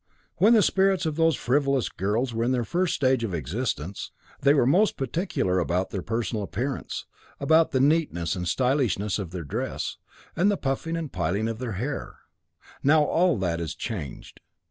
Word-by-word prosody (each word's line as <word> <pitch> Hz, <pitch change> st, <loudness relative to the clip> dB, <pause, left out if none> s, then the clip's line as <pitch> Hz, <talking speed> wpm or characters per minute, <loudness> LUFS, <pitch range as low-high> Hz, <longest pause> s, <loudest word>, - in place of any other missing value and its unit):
'When 210 Hz, +7 st, +5 dB
the 220 Hz, -3 st, +6 dB
spirits 190 Hz, -1 st, +2 dB
of 155 Hz, -2 st, -1 dB
those 165 Hz, -1 st, +3 dB
frivolous 135 Hz, -1 st, +1 dB
girls 115 Hz, +6 st, -1 dB
were 115 Hz, +1 st, -1 dB
in 120 Hz, -, +1 dB
their 125 Hz, -2 st, +1 dB
first 175 Hz, -, 0 dB
stage 130 Hz, -4 st, +2 dB
of 100 Hz, -6 st, -2 dB
existence, 90 Hz, -, -3 dB, 0.3 s
they 140 Hz, -, +4 dB
were 140 Hz, -, +4 dB
most 185 Hz, -, +3 dB
particular 135 Hz, -, -1 dB
about 90 Hz, +2 st, -1 dB
their 95 Hz, -, -3 dB
personal 115 Hz, +1 st, -2 dB
appearance, 125 Hz, +8 st, -4 dB, 0.3 s
about 160 Hz, +3 st, +4 dB
the 130 Hz, -, 0 dB
neatness 140 Hz, -, +1 dB
and 90 Hz, -1 st, -3 dB
stylishness 115 Hz, -, +1 dB
of 95 Hz, -4 st, -4 dB
their 90 Hz, -1 st, -5 dB
dress, 70 Hz, -, -4 dB, 0.4 s
and 185 Hz, +5 st, +3 dB
the 205 Hz, -, +1 dB
puffing 155 Hz, +4 st, -2 dB
and 160 Hz, -4 st, -4 dB
piling 95 Hz, +5 st, 0 dB
up 115 Hz, -1 st, -3 dB
of -, -, -16 dB
their 125 Hz, -4 st, -3 dB
hair. 130 Hz, +9 st, -4 dB, 0.6 s
Now 150 Hz, +2 st, +5 dB
all 170 Hz, 0 st, +2 dB
that 85 Hz, -3 st, -1 dB
is 80 Hz, -1 st, -4 dB
changed. 90 Hz, -, -6 dB
125 Hz, 180 wpm, -26 LUFS, 95-155 Hz, 0.6 s, the